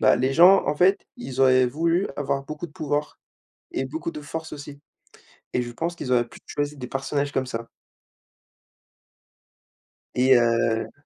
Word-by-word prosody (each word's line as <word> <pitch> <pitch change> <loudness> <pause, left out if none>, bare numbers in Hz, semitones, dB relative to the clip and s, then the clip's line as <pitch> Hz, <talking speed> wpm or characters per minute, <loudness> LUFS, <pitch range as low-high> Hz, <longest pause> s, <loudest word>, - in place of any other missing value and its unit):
Bah - - +5
les 130 +2 +1
gens 180 +5 +7
en 150 - +1
fait, 185 +5 +3
ils 135 - -7
auraient 130 -1 +5
voulu 165 +8 +1
avoir 140 -1 -1
beaucoup 155 +3 -6
de 150 - -20
pouvoir 150 -1 -3 0.5
et 135 - -2
beaucoup 160 +4 -4
de 150 - -8
force 160 +2 -6
aussi 145 -1 -9 0.7
et 125 - +1
je 120 - -7
pense 170 +8 -3
qu'ils 130 -6 -5
auraient 120 -1 +3
plus - - -14
choisi 145 0 -3
des 125 -2 -6
personnages 140 +2 -2
comme 130 -1 -1
ça 115 -2 -5 2.5
et 130 +1 +5
heu 115 -1 +1
140 Hz, 165 wpm, -24 LUFS, 125-155 Hz, 2.5 s, gens